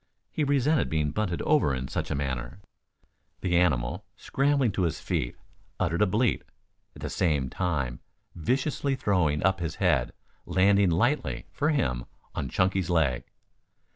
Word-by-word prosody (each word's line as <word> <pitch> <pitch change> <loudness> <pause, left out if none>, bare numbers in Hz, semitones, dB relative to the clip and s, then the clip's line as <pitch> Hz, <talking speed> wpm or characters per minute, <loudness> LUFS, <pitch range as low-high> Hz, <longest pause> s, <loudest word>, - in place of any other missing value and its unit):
He 155 - -1
resented 145 +1 +2
being 75 -2 0
bunted 90 0 -2
over 70 - +3
in 65 - -3
any - - -5
such - - -3
manner. 65 -1 -3 0.8
The 90 -1 0
animal, 75 -9 +1
scrambling 140 -3 +1
to 95 - -2
his 85 -2 0
feet, - - -2 0.4
uttered 85 +5 0
a 105 - +5
bleat, 110 +3 +1 0.5
at - - -11
the - - -2
same 75 -8 0
time 70 -10 -1 0.3
viciously 135 - 0
throwing 90 - +1
up 95 0 +2
his 85 -2 -3
head, - - +1 0.3
landing 100 0 +4
lightly, 120 - 0
for 150 - 0
him, 65 - 0 0.3
on 65 - -3
Chunky's 95 +1 +1
leg. 80 -8 +1
90 Hz, 145 wpm, -27 LUFS, 75-115 Hz, 0.8 s, a